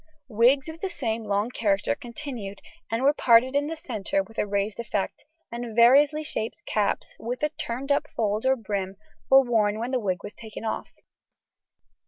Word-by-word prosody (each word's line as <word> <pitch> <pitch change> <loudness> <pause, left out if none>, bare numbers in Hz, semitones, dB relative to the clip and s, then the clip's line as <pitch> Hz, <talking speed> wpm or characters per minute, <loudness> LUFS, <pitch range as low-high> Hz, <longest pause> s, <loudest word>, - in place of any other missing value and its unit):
Wigs 250 +6 +4
of 320 +1 -8
the 390 - -1
same 230 -9 -3
long 205 +3 0
character 205 -2 +1
continued, 240 -6 -7 0.3
and 225 +3 -1
were 285 +2 +5
parted 255 0 +4
in 285 +1 +2
the 325 - -3
centre 215 -10 -2
with 225 +3 -9
a - - +1
raised 200 +2 -1
effect, 210 -4 -3 0.3
and 235 -1 -5
variously 285 +6 +6
shaped 305 +2 -4
caps, 210 -2 -1
with 245 +5 -4 0.2
turned 260 +4 -3
up 285 +1 +2
fold 215 -1 0
or 260 0 +4
brim, 200 -4 -3 0.3
were 270 0 +8
worn 215 -4 +2
when 235 +3 -3
the 255 - +1
wig 185 -5 -2
was - - -7
taken 220 -1 -9
off. 220 - -3
235 Hz, 175 wpm, -26 LUFS, 210-270 Hz, 0.3 s, were